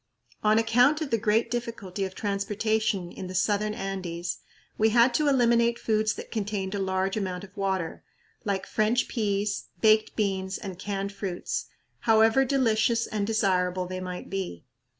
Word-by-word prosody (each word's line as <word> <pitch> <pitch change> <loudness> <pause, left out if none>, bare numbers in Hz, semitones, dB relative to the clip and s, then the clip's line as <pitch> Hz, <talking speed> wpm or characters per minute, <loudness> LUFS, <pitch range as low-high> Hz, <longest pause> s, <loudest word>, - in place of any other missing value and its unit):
On 215 0 +4
account 245 +6 +4
of 295 -4 -3
the 230 - +2
great 220 +2 +1
difficulty 225 -5 -3
of 190 0 -7
transportation 205 -2 -1
in 185 - -7
the 185 - -7
southern 210 +3 +1
Andes 180 -3 -4 0.4
we 220 +1 +3
had 235 +2 +5
to 300 - +2
eliminate 235 -3 +3
foods 215 -1 +1
that - - -9
contained 205 -3 -2
a 200 - -2
large 190 0 0
amount 185 -3 -3
of 200 0 -13
water, 190 -5 -2 0.4
like 195 -2 -1
French 220 +3 +1
peas, 205 -2 -1 0.2
baked 215 -1 +4
beans, 190 -2 -1
and 190 -3 -7
canned 200 0 -3
fruits, 190 -3 -4 0.3
however 225 +3 +4
delicious 235 -3 +2
and 205 -2 -2
desirable 185 -4 +1
they 185 +1 -5
might 180 -1 -6
be. 190 - -5
205 Hz, 155 wpm, -27 LUFS, 190-225 Hz, 0.4 s, had